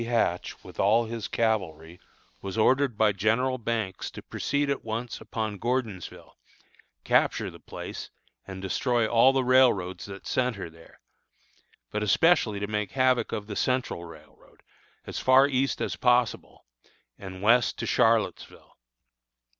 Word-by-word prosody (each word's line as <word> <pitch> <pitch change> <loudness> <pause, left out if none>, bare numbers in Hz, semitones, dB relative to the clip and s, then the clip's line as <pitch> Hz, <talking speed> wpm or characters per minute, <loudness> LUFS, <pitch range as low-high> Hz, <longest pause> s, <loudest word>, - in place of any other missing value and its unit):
Hatch, 115 -7 -1
with - - -13
all 110 +4 +3
his 115 -1 -5
cavalry, 90 -7 -2 0.4
was 95 +1 -6
ordered 130 +1 +2
by 110 -1 +4
General 115 +6 0
Banks 110 -5 -3
to - - -11
proceed 145 +1 -2
at 140 -1 -2
once 115 +2 -5
upon 110 -3 -4
Gordonsville, 115 -7 -4 0.6
capture - - +1
the - - -14
place - - -8 0.4
and 95 0 -8
destroy 120 +4 0
all 120 +3 +5
the 135 -1 +1
railroads 125 -8 +3
that 100 -1 -10
centre 115 -9 -2
there, 80 0 -18 0.9
but 105 - -2
especially 110 - +3
to 100 - -2
make 105 -2 -3
havoc 130 -1 +2
of 105 - -4
the 105 -1 -7
Central 125 -9 -1
road, 85 -3 -16 0.4
as - - -5
far 130 +2 +5
east 135 0 0
as - - -2
possible, 125 -2 0 0.5
and 95 -1 -9
west 120 +2 +3
to - - -4
Charlottesville. - - 0
110 Hz, 140 wpm, -27 LUFS, 100-125 Hz, 0.9 s, all